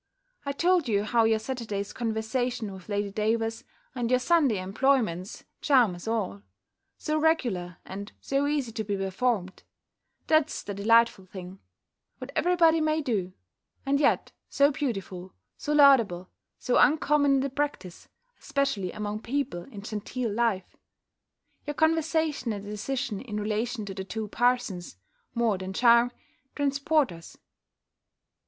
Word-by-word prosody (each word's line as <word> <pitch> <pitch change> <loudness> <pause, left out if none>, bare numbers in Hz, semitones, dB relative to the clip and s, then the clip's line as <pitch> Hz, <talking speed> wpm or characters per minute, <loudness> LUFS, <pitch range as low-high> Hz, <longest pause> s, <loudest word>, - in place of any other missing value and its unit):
I - - +1
told 345 +1 +2
you 205 -2 +2
how 230 +1 +2
your 225 0 +3
Saturday's 220 -4 -4
conversation 225 -1 -2
with 190 +1 -12
Lady 205 -1 -1
Davers, 225 +2 -1 0.3
and 240 -3 -2
your 255 - +4
Sunday 275 - +3
employments, 200 -2 0 0.2
charm 250 -9 +4
us 175 +4 -10
all: 210 -3 -2 0.6
so 310 0 -1
regular, 235 - 0
and 200 +2 -7
so 275 +1 0
easy 285 -5 -1
to 220 0 -3
be 205 -1 -2
performed 195 0 -1 0.6
That's 310 -1 +2
the 205 - -5
delightful 220 -1 +3
thing 185 0 -9 0.6
What - - -8
every 360 +1 +2
body 330 -2 +4
may 310 0 +1
do; 195 -8 -1 0.5
and 280 +1 +2
yet 295 - +2 0.2
so 280 +1 +4
beautiful, 195 - -4 0.2
so 295 - -4
laudable, 230 -12 +5 0.3
so 250 - 0
uncommon 285 0 +4
in - - +3
the 275 0 -2
practice, 270 -11 -4 0.3
especially 275 -10 -1
among 210 0 -4
people 235 -10 -3
in 205 -7 -10
genteel 220 +2 -3
life! 215 -5 -1 0.9
Your 295 - -3
conversation 315 -5 +1
and 200 -1 -7
decision 210 +1 -3
in 210 -5 -5
relation 215 +2 -2
to 195 - -6
the 190 0 -5
two 215 +2 -5
parsons 240 - 0 0.4
(more 230 -5 +1
than 190 0 -5
charm) 235 +2 +5 0.4
transport 285 - +1
us. 165 -1 -12
230 Hz, 140 wpm, -27 LUFS, 200-275 Hz, 0.9 s, laudable